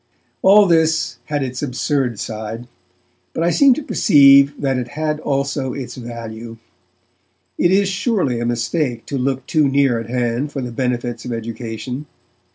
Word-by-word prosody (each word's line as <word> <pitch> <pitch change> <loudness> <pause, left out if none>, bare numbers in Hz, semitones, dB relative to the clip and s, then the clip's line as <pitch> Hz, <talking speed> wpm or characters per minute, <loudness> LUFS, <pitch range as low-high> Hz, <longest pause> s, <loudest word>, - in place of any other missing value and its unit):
All 205 +2 +6
this 160 -2 +1
had 145 -2 -2
its 130 -1 -5
absurd 125 -3 -1
side, 110 +2 -6 0.7
but 165 - -2
I 170 - +2
seem 275 - +5
to 310 - -5
perceive 140 - +5
that 135 -2 0
it 125 - -4
had 155 -1 -1
also 140 -2 -2
its 135 -3 -6
value. 115 -1 -8 1.0
It 175 - +3
is, 195 +2 +3
surely, 190 - 0
a 120 - -2
mistake 120 +1 -2
to 140 - -4
look 130 0 -2
too 155 -2 +2
near 135 -3 +2
at 115 0 -8
hand 125 +3 -1
for 140 - -5
the 125 - -5
benefits 120 -1 -3
of 125 - -6
education. 115 +4 -6
130 Hz, 160 wpm, -19 LUFS, 120-150 Hz, 1.0 s, All